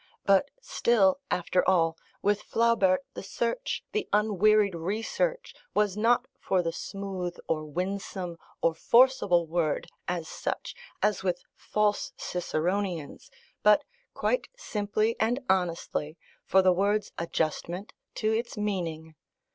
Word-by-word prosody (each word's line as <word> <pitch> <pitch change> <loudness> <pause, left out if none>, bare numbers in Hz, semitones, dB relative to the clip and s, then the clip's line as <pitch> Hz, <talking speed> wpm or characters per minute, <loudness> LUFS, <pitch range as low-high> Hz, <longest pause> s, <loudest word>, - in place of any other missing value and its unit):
But 200 +8 +4
still, 235 - +3
after 180 +1 +1
all, 165 -3 +3 0.3
with 205 +1 +2
Flaubert, 230 -1 +2
the - - -6
search, 235 - -2
the 425 -1 -2
unwearied 210 -1 +4
research, 225 - -2 0.2
was 210 -2 +2
not 235 +4 +3
for 185 -2 +1
the 165 - -1
smooth, 185 -1 -5
or 155 -1 -1
winsome, 180 +1 -4 0.2
or 165 - +4
forcible 230 -4 +4
word, 160 -2 0 0.2
as 175 -3 -2
such, - - -4 0.3
as 210 0 +2
with 180 -2 -1
false 210 -1 0
Ciceronians, 175 -1 -2 0.3
but 210 0 +5 0.3
quite - - 0
simply 215 - -1
and 235 +4 +2
honestly, 170 -4 -1 0.3
for 190 0 +4
the 185 -1 +5
word's 205 +3 +1
adjustment 170 +3 -2 0.2
to 215 0 0
its 230 0 -3
meaning. 170 -6 -3
195 Hz, 120 wpm, -28 LUFS, 175-215 Hz, 0.3 s, but